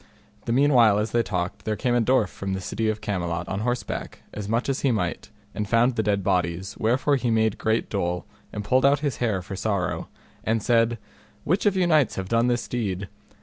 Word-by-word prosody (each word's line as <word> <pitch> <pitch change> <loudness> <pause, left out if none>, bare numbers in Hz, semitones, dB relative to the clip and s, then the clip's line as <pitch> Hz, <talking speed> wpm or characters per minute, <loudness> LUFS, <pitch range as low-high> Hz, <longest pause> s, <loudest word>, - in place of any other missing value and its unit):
The - - -2
meanwhile 120 -5 +5
as 105 +2 -1
they 120 - +3
talked, 90 -1 -3
there 110 - -1
came 120 +4 0
a 120 - +3
dwarf 115 -4 +2
from 95 0 -5
the 95 - -2
city 110 +4 -2
of 110 0 -2
Camelot 90 -3 -2
on 95 - -3
horseback, 120 +3 -3
as 105 -1 -5
much 115 +2 0
as 135 -1 0
he 140 - +1
might; 90 -7 -2 0.2
and 105 -2 -3
found 120 +2 +3
the 110 - +1
dead 100 -2 0
bodies, 90 -1 -1
wherefore 130 +5 +2
he 125 -2 -1
made 110 -2 +1
great 110 +1 0
dole, 90 -3 -2 0.3
and 105 - -5
pulled 130 +6 +2
out 140 +1 +4
his 145 -3 -1
hair 105 -7 -1
for 95 +1 -6
sorrow, 100 -2 -2 0.3
and 110 -1 0
said, 115 -1 +3 0.5
Which 185 +7 +1
of 200 - +2
you 185 -1 +2
knights 155 -8 +3
have 95 0 -4
done 115 +1 +3
this 120 -1 0
deed? 100 -5 -3
110 Hz, 215 wpm, -25 LUFS, 100-120 Hz, 0.5 s, meanwhile